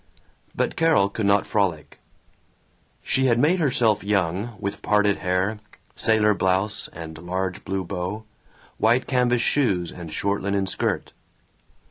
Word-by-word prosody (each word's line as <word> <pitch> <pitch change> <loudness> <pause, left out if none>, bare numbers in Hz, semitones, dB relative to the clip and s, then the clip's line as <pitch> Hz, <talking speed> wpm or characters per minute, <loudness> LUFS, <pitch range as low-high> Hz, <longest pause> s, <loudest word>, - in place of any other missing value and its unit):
But - - -1
Carol 160 -12 +3
could 100 0 -2
not 100 0 +3
frolic. 95 -7 -1 1.0
She 130 0 +1
had 120 -2 +3
made 155 +9 +3
herself 120 -8 +2
young, 100 +2 -1
with 100 - -4
parted 105 0 +2
hair, 95 +4 -1 0.3
sailor 110 -1 +3
blouse 95 +2 -1
and 80 -1 -9
large 95 +2 -3
blue 95 -1 -2
bow, 90 +4 -4 0.6
white 120 +4 +3
canvas 125 -2 +1
shoes 95 -12 +1
and 85 -3 -9
short 100 +5 -1
linen 100 0 0
skirt. 95 - -2
100 Hz, 130 wpm, -24 LUFS, 95-115 Hz, 1.0 s, Carol